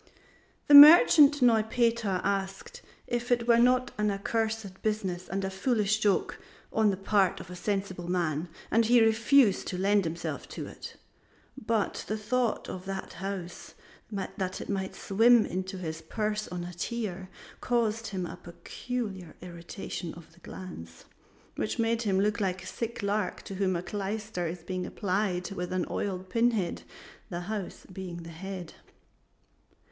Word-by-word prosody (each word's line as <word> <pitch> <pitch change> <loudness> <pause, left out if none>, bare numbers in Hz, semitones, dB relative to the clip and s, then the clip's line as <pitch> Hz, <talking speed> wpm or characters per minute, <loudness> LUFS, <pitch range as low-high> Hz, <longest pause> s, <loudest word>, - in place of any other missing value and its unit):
The 290 - +3
merchant 290 -1 +9
Neupeter 230 -3 +2
asked 195 - -3 0.2
if 240 0 -3
it 240 -1 +2
were 235 -1 +5
not 250 +1 +3
an 210 0 +2
accursed 215 -1 -2
business 190 -5 -2
and 195 0 -2
a 190 - -3
foolish 215 +1 +1
joke 205 -3 +1 0.3
on 220 -1 +3
the 195 - -1
part 195 -1 +2
of - - -10
a - - -7
sensible 190 -2 -3
man, 170 -2 -1 0.2
and 230 +1 +4
he 240 +1 +6
refused 225 0 +4
to 180 - -3
lend 200 +1 +2
himself 165 +1 -4
to - - -6
it; - - -10 0.6
but 225 -5 -1
the 215 - -2
thought 235 +2 0 0.2
that 195 -1 -5
a - - -13
house 190 -2 -6 0.3
might 190 -1 -4
swim 225 +3 +4
into 190 +1 -4
his 160 -3 -5
purse 210 +5 -2
on 180 -1 -5
a 175 +1 -7
tear 190 -1 -4 0.3
caused 230 -2 0
him 185 -2 -3
a 175 - -7
peculiar 190 +2 -6
irritation 175 -1 -7
of 170 -1 -14
the 170 - -21
glands, 85 - -10 0.5
which 215 - -2
made 230 0 +1
him 195 -4 +1
look 210 +3 +1
like 185 -2 -1
a - - -11
sick 230 +3 -5
lark 200 -2 -1
to - - -8
whom 190 -1 0
a 170 - -3
clyster 205 -2 -3
is 165 0 -6
being 185 0 -4
applied 185 -1 -1
with 180 -2 -4
an 185 -1 0
oiled 190 -2 -3
pinhead 225 -3 0 0.5
the 175 0 -4
house 205 0 -5
being 175 -2 -7
the 165 - -9
head. 180 +1 -7
195 Hz, 150 wpm, -29 LUFS, 180-225 Hz, 0.6 s, merchant